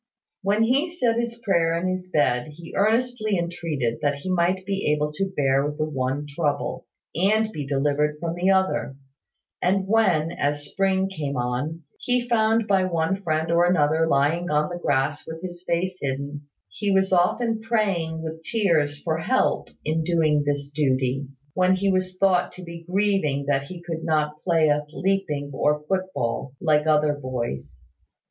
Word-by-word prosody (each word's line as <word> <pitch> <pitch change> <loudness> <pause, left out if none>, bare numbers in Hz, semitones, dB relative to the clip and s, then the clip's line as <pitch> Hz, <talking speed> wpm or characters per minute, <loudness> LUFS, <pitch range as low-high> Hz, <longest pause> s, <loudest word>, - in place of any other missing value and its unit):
When 205 +3 +2
he 270 +9 +2
said 245 -9 0
his 235 0 -2
prayer 170 -3 +2
in 180 - -1
his 185 0 -3
bed, 145 -3 +1
he 170 +1 -11
earnestly 215 0 +1
entreated 160 -9 -2
that 145 -1 +1
he 165 +7 -5
might 185 +1 +1
be 195 -5 0
able 150 0 0
to 195 +5 -2
bear 135 0 +2
the 155 - 0
one 135 0 -2
trouble, 145 -1 -2 0.3
and 215 +6 +2
be 145 -8 -5
delivered 145 +2 +1
from 165 +1 -2
the 175 +2 +1
other; 190 -7 +1 0.7
and 190 +2 +2
when, 190 -7 +3
as 145 -3 0
the 145 - -7
spring 190 -1 +1
came 145 -7 -4
on, 130 +7 -2 0.2
he 250 0 +1
was 240 - -13
found 225 -1 +3
by 195 -2 +3
one 185 +2 0
friend 160 -2 -1
or 170 +1 +4
another 160 -2 +3
lying 160 +4 +1
on 150 +1 +1
the 175 0 -5
grass 145 -1 0
with 160 +2 -7
his 175 -1 -7
face 180 +2 -1
hidden, 140 +1 -4 0.2
he 200 - -3
was 190 -1 +2
often 220 +6 +2
praying 195 -8 0
with 160 0 -6
tears 160 -9 +1
for 160 -1 -1
help 260 +11 +1 0.2
in 160 +1 0
doing 155 -3 +2
this 145 -1 -1
duty, 135 -2 0 0.3
when 185 0 +3
he 195 +1 +1
was 185 0 -1
thought 185 -2 +3
to 185 - -10
be 170 -1 -9
grieving 185 -8 +1
that 140 -1 +1
he 175 +3 -9
could 165 -2 -5
not 150 -1 0
play 165 -3 +3
at 150 0 0
leaping 175 -8 -1
or 150 +2 +1
foot 185 +3 -1
ball, 120 +3 -2
like 150 -1 +2
other 150 -1 +3
boys. 120 - -5
165 Hz, 175 wpm, -24 LUFS, 145-190 Hz, 0.7 s, or